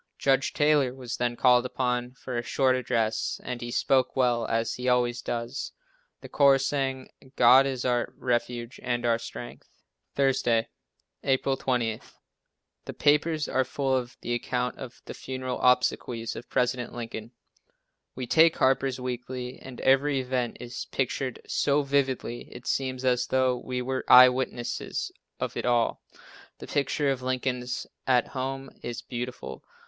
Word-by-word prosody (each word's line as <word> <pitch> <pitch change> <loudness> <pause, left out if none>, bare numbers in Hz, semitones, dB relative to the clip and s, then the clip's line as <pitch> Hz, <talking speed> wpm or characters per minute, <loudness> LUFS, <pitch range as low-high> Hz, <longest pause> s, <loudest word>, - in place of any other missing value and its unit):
Judge 135 -1 +2
Taylor 145 -4 +3
was 130 -2 -5
then 120 0 0
called 125 0 +5
upon 125 -1 -2
for 130 -1 -7
a 120 - 0
short 130 +2 +2
address, 115 -3 -1
and 125 -1 -5
he 120 - -5
spoke 130 +2 +2
well, 120 -3 +2
as 115 0 0
he 125 0 -2
always 125 -1 +2
does. 120 +3 -4 0.5
The - - -9
choir 140 -1 +5
sang 135 -1 -1 0.3
"God 130 +3 +7
is 130 -2 -3
our 125 -1 +1
refuge 120 0 -2
and 120 -1 -1
our 115 -1 +2
strength." 120 +1 -9 0.5
Thursday, 130 -4 +2 0.5
April 135 0 +1
20. 120 -4 -1 0.8
The - - -6
papers 150 +1 +2
are 130 - +1
full 135 +1 -1
of 125 -1 -3
the 120 - -2
account 125 +1 -2
of 125 -2 -9
the - - -7
funeral 130 -1 -5
obsequies 125 -2 +1
of 120 - -9
President 125 -1 -1
Lincoln. 115 -2 -6 0.9
We 130 - -4
take 160 +6 +5
Harper's 130 0 +2
Weekly 125 0 -5
and 130 -2 -10
every 135 +1 +3
event 125 -2 -2
is 120 0 -6
pictured 130 -1 -2
so 145 0 +1
vividly 135 -4 -1
it 120 - -11
seems 130 -1 -2
as 125 -1 +2
though 130 -1 +2
we 125 0 -4
were 130 +1 -2
eye 125 0 +10
witnesses 125 -1 -3 0.3
of - - -3
it - - -3
all. 120 -1 +1 0.6
The - - -9
picture 145 0 0
of 130 -2 -3
"Lincoln 130 0 -1 0.4
at 125 -2 +3
home" 135 0 -4
is 120 -1 -5
beautiful. 125 0 -6
125 Hz, 150 wpm, -27 LUFS, 120-135 Hz, 0.9 s, eye